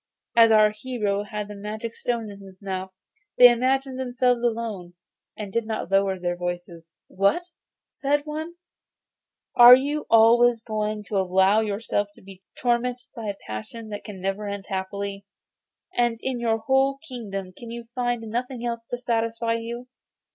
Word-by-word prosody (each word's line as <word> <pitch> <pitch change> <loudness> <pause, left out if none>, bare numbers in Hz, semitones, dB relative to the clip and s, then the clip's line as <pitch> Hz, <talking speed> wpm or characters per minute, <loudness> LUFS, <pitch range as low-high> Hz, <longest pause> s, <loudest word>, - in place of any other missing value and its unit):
As 230 -1 +7
our 215 -1 +6
hero 210 -3 -2
had 210 0 -5
the 210 - -8
magic 215 +3 -5
stone 230 -3 -3
in 200 - -11
his 190 -1 -14
mouth 190 -1 -5 0.5
they 245 -1 +10
imagined 260 +2 0
themselves 250 -1 +1
alone, 220 -7 -3 0.4
and 205 -3 -6
did 230 -1 -1
not 220 -4 -4
lower 195 -1 +2
their 175 -1 -2
voices. 175 -1 -6 0.2
'What!' 200 - +1 0.4
said 290 +1 -1
one, 315 +3 -5 1.0
'are 245 +1 +11
you 290 +3 -2
always 230 +1 +5
going 215 -1 -2
to 205 0 -3
allow 190 +3 +3
yourself 205 -1 -1
to - - -17
be 190 -1 -13 0.2
tormented 245 0 -1
by 225 -3 -6
a 200 -1 -3
passion 160 - -7
which 205 - -6
can 205 -3 -8
never 195 +2 -3
end 200 -1 -5
happily, 200 +1 -4 0.7
and 240 -1 +2
in 260 -2 -2
your 225 -1 +1
whole 265 +4 +2
kingdom 195 - -6
can 235 - -10
you 235 0 -6
find 245 -2 -1
nothing 240 +2 -4
else 235 -1 -3
to 245 - -3
satisfy 230 -1 -1
you? 235 +2 -5
225 Hz, 160 wpm, -25 LUFS, 200-245 Hz, 1.0 s, are